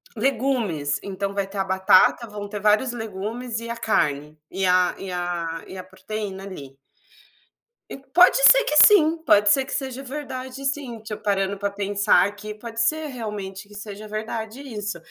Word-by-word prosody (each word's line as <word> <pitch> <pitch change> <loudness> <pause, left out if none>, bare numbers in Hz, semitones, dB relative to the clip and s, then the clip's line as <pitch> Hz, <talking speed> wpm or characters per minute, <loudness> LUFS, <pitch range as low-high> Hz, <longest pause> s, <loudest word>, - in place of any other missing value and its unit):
legumes, 225 - -1
então 200 0 -4
vai 200 -1 -2
ter 195 +1 -10
a 195 - +1
batata, 190 +4 +3
vão 205 -1 -8
ter 210 0 -6
vários 215 +4 +2
legumes 225 +2 -5
e 230 0 -8
a 235 - -4
carne, 150 -9 -1
e 190 +1 -3
a 180 0 +2
e 190 -1 -7
a 175 -2 -4
e 190 - -10
a 185 - -7
proteína 195 0 -7
ali. 140 -9 -10 1.1
E - - -8
pode 275 - +4
ser - - +8
que 300 - -1
sim, 335 -6 +5
pode 205 0 +5
ser 265 +5 +4
que - - -5
seja 265 -1 -3
verdade 265 -1 -7
sim, 270 -5 -3
tipo 215 -1 -8
parando 195 -1 -1
para 200 0 -2
pensar 200 -2 +2
aqui 205 +1 -7
pode 230 +1 -8
ser 310 +5 +1
realmente 210 -6 -7
que 205 - -16
seja 210 0 -8
verdade 220 +3 -6
isso, 210 -8 -5
210 Hz, 175 wpm, -22 LUFS, 195-245 Hz, 1.1 s, ser